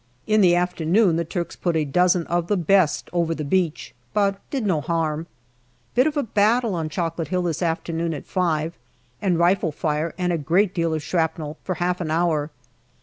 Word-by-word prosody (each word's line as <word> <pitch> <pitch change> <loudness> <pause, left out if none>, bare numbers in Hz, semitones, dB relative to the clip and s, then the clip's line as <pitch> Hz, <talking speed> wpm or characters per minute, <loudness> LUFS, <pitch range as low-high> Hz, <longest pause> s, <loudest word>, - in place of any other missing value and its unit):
In 215 0 +3
the 175 -2 +5
afternoon 180 +2 +2
the 170 - 0
Turks 170 +1 -4
put 175 -2 -1
a 155 -1 +1
dozen 175 +3 +2
of 170 0 -1
the 205 - +1
best 180 -2 +2
over 170 -2 +1
the 155 - -4
beach, 165 +1 -1 0.2
but 200 -1 +2
did 265 -6 -2
no 175 -7 +1
harm. 160 0 -1 0.7
Bit 255 +4 +4
of 305 -1 -2
a 290 - +2
battle 220 +1 +2
on 160 -3 -2
Chocolate 165 0 -2
Hill 180 -1 -1
this 170 -1 -2
afternoon 165 -1 -1
at 145 - -8
five, 165 -3 0 0.5
and 185 -5 +1
rifle 175 -1 +2
fire, 155 +2 -2
and 180 -1 0
a 165 - -1
great 180 +6 +2
deal 165 -3 0
of 155 - -4
shrapnel, 160 -3 -2
for 185 - -2
half 180 +1 -1
an 165 - -3
hour. 160 -2 +1
170 Hz, 195 wpm, -23 LUFS, 160-185 Hz, 0.7 s, the